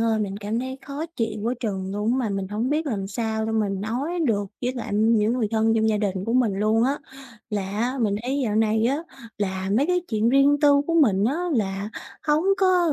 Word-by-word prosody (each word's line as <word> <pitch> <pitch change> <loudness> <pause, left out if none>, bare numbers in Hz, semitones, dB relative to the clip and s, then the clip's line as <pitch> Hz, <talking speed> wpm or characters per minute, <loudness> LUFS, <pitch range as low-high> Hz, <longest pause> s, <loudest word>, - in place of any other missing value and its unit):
ơi, 225 -1 +2
mình 200 -2 -2
cảm 210 +2 -3
thấy 260 +1 -5
khó 285 +3 -4
chịu 220 -2 -2
quá 235 +3 0
chừng 195 -5 -3
luôn 210 +3 0
á, 260 - +1
mà 245 -4 0
mình 195 -1 -3
hổng 220 +6 -2
biết 305 +1 0
làm 200 -7 -2
sao 220 +2 -2
để 225 - -2
mà 220 -2 +1
nói 235 - -2
được 205 -4 +1 0.2
với 250 +1 0
lại 245 -5 -5
những 220 +1 +3
người 240 -4 0
thân 225 0 +2
trong 220 0 +2
gia 215 - +2
đình 195 -3 -1
của 230 - -2
mình 245 -4 +3
luôn 215 +3 +2
á, 275 +3 0 0.5
là 210 -2 -1
á, 240 +6 -1
mình 210 -3 +1
thấy 265 +3 -1
dạo 210 -2 0
này 220 +1 +2
á, 270 - +1 0.4
là 190 -1 -2
mấy 280 +6 +3
cái 360 0 +2
chuyện 220 0 +1
riêng 275 +2 +5
tư 285 -1 +5
của 335 - 0
mình 210 - +4
á, 270 +8 +1 0.2
là 200 -2 -1 0.4
hổng 300 +3 +2
có 365 -4 +3
225 Hz, 235 wpm, -24 LUFS, 210-260 Hz, 0.5 s, riêng